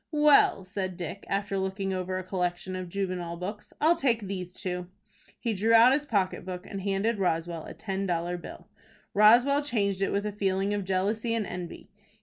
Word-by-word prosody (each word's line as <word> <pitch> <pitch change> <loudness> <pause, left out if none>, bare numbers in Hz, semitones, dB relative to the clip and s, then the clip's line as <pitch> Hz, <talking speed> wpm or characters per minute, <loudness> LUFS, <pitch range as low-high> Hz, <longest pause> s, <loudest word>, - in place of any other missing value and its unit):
"Well," 295 -9 +5
said 185 -1 -4
Dick, 180 +3 -6
after 195 0 -1
looking 190 0 -2
over 185 0 -2
a 185 - -4
collection 180 0 -2
of 185 -1 -5
juvenile 180 -3 -3
books, 200 +4 -6
"I'll 320 +3 +5
take 245 -8 +1
these 185 -2 -5
two." 180 -2 -4 0.5
He 230 -3 -1
drew 220 +3 +3
out 235 +3 +8
his 295 +1 0
pocket 195 -6 0
book, 180 0 -6
and 195 - -5
handed 200 +3 0
Roswell 165 -2 -1
a - - -9
ten 195 -2 -3
dollar 175 0 -1
bill. 175 - -10 0.5
Roswell 240 +7 +6
changed 200 -9 0
it 195 - +1
with 200 +1 -1
a 210 - -1
feeling 195 0 0
of 205 -2 -2
jealousy 210 +5 0
and 220 -2 -1
envy. 180 -2 -7
195 Hz, 185 wpm, -28 LUFS, 185-210 Hz, 0.5 s, out